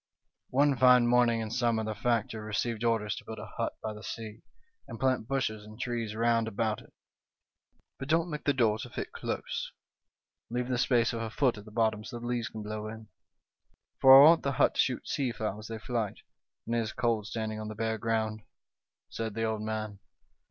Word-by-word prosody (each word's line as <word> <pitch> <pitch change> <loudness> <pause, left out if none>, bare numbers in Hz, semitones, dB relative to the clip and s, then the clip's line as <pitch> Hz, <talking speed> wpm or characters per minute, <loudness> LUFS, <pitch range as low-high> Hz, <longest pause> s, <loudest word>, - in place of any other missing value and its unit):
" - - -57
One 140 +1 +3
fine 125 0 +6
morning 120 -1 +3
in 110 -1 -4
summer 115 -2 +1
the 110 0 -2
factor 115 -1 -1
received 110 +1 -2
orders 115 -3 +1
to - - -8
build 110 - -8
a 105 - -7
hut 115 - -1
by 110 - -3
the 105 - -10
sea, 110 0 -7 0.5
and 115 - -8
plant 130 -4 +1
bushes 120 -6 -1
and 110 +2 -13
trees 120 -4 -3
round 115 0 +2
about 110 0 -1
it. - - -19 0.5
' - - -47
But 135 - -5
don't 165 +3 +1
make 150 0 -5
the 145 - +4
door 110 -5 +2
to 125 - -6
fit - - -5
close; - - -4 0.8
leave 125 +1 -2
the 125 -2 0
space 120 -1 +2
of 115 - -3
a 115 - -3
foot 120 -1 +1
at 105 - -13
the 105 - -12
bottom, 110 -1 +1
so 120 +2 -7
the 120 - -8
leaves 120 -1 -1
can 110 -1 -7
blow 105 0 -5
in, 110 0 -9 0.9
for 135 0 +10
I 140 - +10
want 165 0 +6
the 140 - -1
hut - - +3
to - - -7
shoot - - -2
sea 130 -3 -1
fowl 110 -2 -3
as 110 - -9
they 115 - -5
flight, 110 -2 -3 0.4
and 115 - -3
it 120 - +2
is 110 -1 -3
cold 115 -3 0
standing 110 -1 -3
on 110 - -5
the 110 - -6
bare 110 0 -1
ground,' 110 -1 -1 0.7
said 110 -2 -5
the 115 - -1
old 110 -1 -1
man. 110 -2 -4
115 Hz, 215 wpm, -30 LUFS, 110-120 Hz, 0.9 s, for